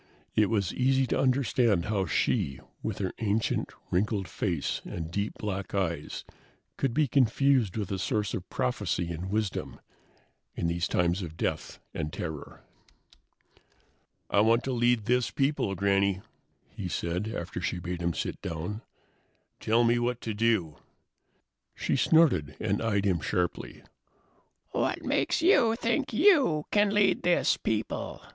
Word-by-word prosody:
It 105 -1 +4
was 100 -5 0
easy 130 +1 +2
to - - -1
understand 125 -7 +2
how 100 -4 0
she, 70 -3 0 0.2
with 110 -3 -3
her 95 -2 -2
ancient, 110 0 0 0.2
wrinkled 100 +1 0
face 85 -3 -2
and 80 -1 -6
deep 100 +3 -2
black 100 -1 -4
eyes, 90 -4 -2 0.5
could 135 - 0
be 150 +4 +2
confused 130 -3 +2
with 100 -3 -3
a 95 - -2
source 105 -2 -1
of 90 -1 -5
prophecy 105 -9 -1
and 85 +3 -5
wisdom 105 -1 -2 0.8
in - - -2
these 85 +1 0
times 90 +2 +1
of 80 -2 -7
death - - -3 0.2
and 75 -1 -3
terror. 80 -4 -6 1.6
"I - - +2
want 115 +3 +4
to 135 - -2
lead 120 -3 +2
this 125 +1 +2
people, 135 -8 0
Granny," 100 0 +2 0.5
he 95 - -6
said, 90 +3 -2
after 90 -5 -5
she 90 - -1
had 90 - -7
bade 90 -1 -4
him 85 -1 0
sit - - -4
down. 85 +7 -4 0.8
"Tell 115 +2 +3
me 120 +1 +3
what 120 0 -1
to 110 - -3
do." 105 -8 +1 1.0
She - - 0
snorted 145 - +3
and 105 -2 0
eyed 105 -3 +1
him 90 -4 +2
sharply. 90 +2 -2 0.9
"What - - -1
makes - - 0
you 235 - +5
think 235 +5 -1
you 260 - +4
can 205 0 +4
lead 205 -1 +3
this 175 0 +3
people?" 110 0 -3
105 Hz, 145 wpm, -28 LUFS, 90-125 Hz, 1.6 s, you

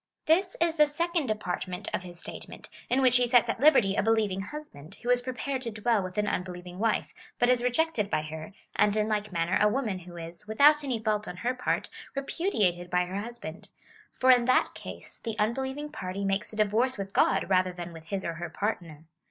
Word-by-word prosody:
This 365 +4 +2
is 335 0 +1
the 300 0 +6
second 335 0 -1
de 215 - +1
partment 180 -1 -4
of - - 0
his 175 -2 -8
statement, - - -9 0.2
in 265 +2 +2
which 250 -1 +5
he 245 0 +2
sets 245 0 +4
at - - -1
liberty 235 -9 +5
a - - +2
be 225 - 0
lieving 210 -4 +2
husband, 205 - -9
who 245 - +1
is 245 0 +4
prepared 255 +2 -3
to 235 -3 -3
dwell 220 0 +1
with 185 0 -6
an 210 - +2
unbeliev 180 -3 -3
ing 180 +1 -9
wife, 225 0 0 0.2
but 245 - +3
is 250 -1 +3
rejected 250 -4 +1
by 155 - 0
her, 155 +2 -7 0.2
and 210 0 +3
in 215 0 +2
like 210 -1 -1
manner 170 0 +1
a 210 - +6
woman 215 -4 -1
who 175 -1 -11
is, 170 +4 -8
without 290 +7 +5
any 260 -4 -1
fault 215 -1 -1
on 180 - -6
her 250 - +2
part, 255 - -1 0.3
repudiated 210 - 0
by 180 0 +2
her 190 +3 -4
husband; 220 -7 -8 0.4
for 260 0 +4
in 245 -1 +5
that 255 - +3
case - - -10
the 225 -2 -5
unbelieving 265 +7 -1
party 195 -6 -4
makes 195 +1 -1
a - - -9
divorce 220 +5 +2
with 195 0 -5
God - - +3
rather 185 -1 +3
than 175 -1 -7
with 165 -1 -12
his 195 0 -3
or 170 - -2
her 170 +1 -5
partner. 170 -5 -3
215 Hz, 220 wpm, -28 LUFS, 180-255 Hz, 0.4 s, the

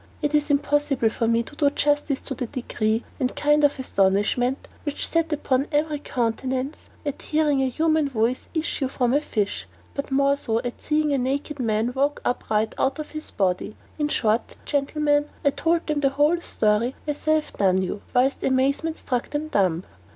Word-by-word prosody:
It 295 0 -1
is 295 0 +2
impossible 285 -4 +2
for 230 - -1
me 230 0 +3
to 290 - -12
do 290 -1 +3
justice 290 -1 +1
to 275 - -5
the 250 -1 -4
degree 225 -2 -1 0.2
and 255 -2 -1
kind 295 0 +3
of 290 - +4
astonishment 215 +4 +1
which 290 -2 -2
sat 330 -1 0
upon 275 -2 +1
every 300 0 +1
countenance 255 +3 -2 0.2
at 285 - -3
hearing 300 -3 +1
a 265 - +2
human 310 +2 +2
voice 235 0 0
issue 310 -4 0
from 250 -2 0
a 290 - +3
fish, 210 -8 -2 0.3
but 280 - -4
more 275 +1 +3
so 225 -5 -1
at 245 -1 -6
seeing 300 -1 +1
a 275 - +2
naked 280 +3 -2
man 225 0 0
walk 280 +2 +1
upright 220 -3 0
out 270 +1 +1
of 305 - -6
his 310 0 -6
body; 190 +2 -1 0.2
in 295 - +2
short, 225 -5 0
gentlemen, 290 +1 +1 0.2
I 280 - +5
told 335 +3 +1
them 300 -1 0
the 275 -1 +3
whole 295 +5 +2
story, 220 -1 +1
as 295 +1 -4
I 310 - +5
have 310 -1 0
done 190 -1 +3
you, 195 +2 -4
whilst 260 +2 +2
amazement 275 +5 +1
struck 245 -2 -2
them 300 +1 -3
dumb. 185 - +1
275 Hz, 185 wpm, -24 LUFS, 240-295 Hz, 0.3 s, I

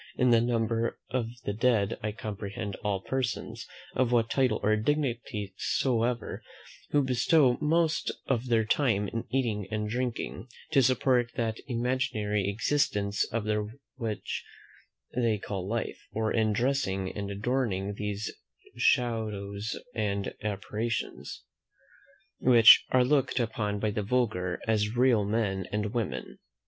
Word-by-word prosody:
In 125 -1 +4
the 115 -1 +6
number 115 -1 0
of 125 -3 0 0.2
the 100 - -1
dead 110 -2 +1
I 105 - -2
comprehend 105 -1 -5
all 100 -3 -2
persons, 130 0 -3 0.3
of 125 -1 +1
what 115 -2 +2
title 130 -5 +2
or 110 +1 +4
dignity 115 -5 -1
soever, 120 -2 0 0.5
who 145 -1 +3
bestow 130 +1 +3
most 160 +1 +2 0.2
of 130 -1 0
their 115 -2 +3
time 105 -5 +1
in 115 - -4
eating 110 -6 -1
and 105 0 -2
drinking, 120 +1 -3 0.2
to 140 -4 +5
support 125 -1 +2
that 115 -1 -1
imaginary 115 -5 0
existence 105 -3 +1
of 115 -1 -1
theirs 105 0 -1 0.3
which 115 -4 -3 0.7
they 115 -3 +2
call 95 -2 -5
life; 115 0 -3
or 110 0 -1
in 110 -1 +2
dressing 105 -5 0
and 100 -1 -4
adorning 100 -2 -1
those 105 0 -3 0.4
shadows 110 -3 0 0.2
and 100 -1 -1
apparitions, 105 +2 -3 1.0
which 120 -3 +8
are 130 -1 +4
looked 135 -1 +2
upon 105 -3 -1
by 110 +1 0
the 105 - -2
vulgar 100 -6 0
as 110 +1 +1
real 125 -4 +4
men 100 -3 -1
and 105 +1 -2
women. 95 - -3
110 Hz, 130 wpm, -29 LUFS, 105-125 Hz, 1.0 s, which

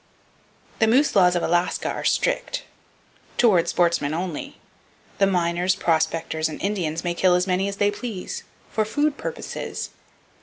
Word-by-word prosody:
The 220 - +4
moose 265 +7 +3
laws 180 -2 +5
of 175 - 0
Alaska 175 +1 +1
are - - -3
strict—toward 185 -8 -1
sportsmen, 170 -4 +1
only! 170 -3 -4 0.6
The 195 - +5
miners, 180 0 +1
"prospectors" 160 -2 0
and 155 - -7
Indians 170 -6 -2
may 175 -1 0
kill 180 +1 +3
as 180 0 +2
many 190 +1 +1
as 200 0 -4
they 205 0 +3
please, 205 -3 -5 0.3
"for 220 - +1
food 290 +7 0
purposes." - - -5
180 Hz, 140 wpm, -24 LUFS, 170-205 Hz, 0.6 s, laws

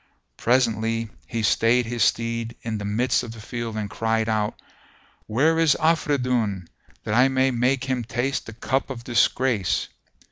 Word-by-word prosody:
Presently 115 -2 +1 0.2
he 115 -2 -3
stayed 115 +5 +3
his 120 0 -4
steed 115 +1 0
in 110 -2 -3
the 100 - -5
midst 115 +5 +1
of 115 - -7
the 115 - -11
field 115 0 -5
and 105 -1 -2
cried 110 +1 -1
out, 110 -1 -1 0.7
"Where 150 +9 +2
is 165 -2 +4
Afridun, 125 - +1 0.4
that 105 - -2
I 125 +4 +5
may 130 0 +2
make 125 +2 +1
him 130 -3 -1
taste 120 +4 -2
the 115 - -8
cup 130 +5 -1
of 120 -3 -6
disgrace?" 120 -3 +1
115 Hz, 155 wpm, -24 LUFS, 110-130 Hz, 0.7 s, I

